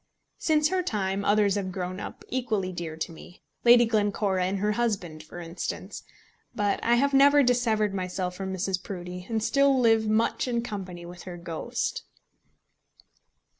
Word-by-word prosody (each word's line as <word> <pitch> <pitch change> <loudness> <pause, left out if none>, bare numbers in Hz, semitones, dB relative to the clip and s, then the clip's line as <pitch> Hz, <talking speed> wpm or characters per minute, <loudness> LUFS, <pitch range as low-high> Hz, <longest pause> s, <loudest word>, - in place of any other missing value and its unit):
Since 305 -1 +2
her 375 0 +1
time 200 - -1
others 205 -1 +3
have 195 -2 -2
grown 185 0 -4
up - - -8
equally 220 -7 -1
dear 170 -3 -6
to 160 - -3
me, 175 +2 -14 0.2
Lady 240 0 +7
Glencora 205 -4 +1
and 190 +2 -1
her 210 +2 +1
husband, 200 -9 -2
for 155 +3 -10
instance; 170 +1 -5 0.5
but 205 -3 0
I 235 - +4
have 280 +3 +2
never 285 +1 +6
dissevered 225 -5 +2
myself 185 -1 -3
from 190 +1 -5
Mrs. 190 0 -1
Proudie, 180 -1 -7
and 220 -2 -1
still 275 +1 +3
live 225 -2 +4
much 225 +4 +1
in 235 -1 0
company 185 -6 -6
with 175 0 -10
her 175 - -7
ghost. 170 -2 -3
200 Hz, 160 wpm, -27 LUFS, 180-235 Hz, 0.5 s, Lady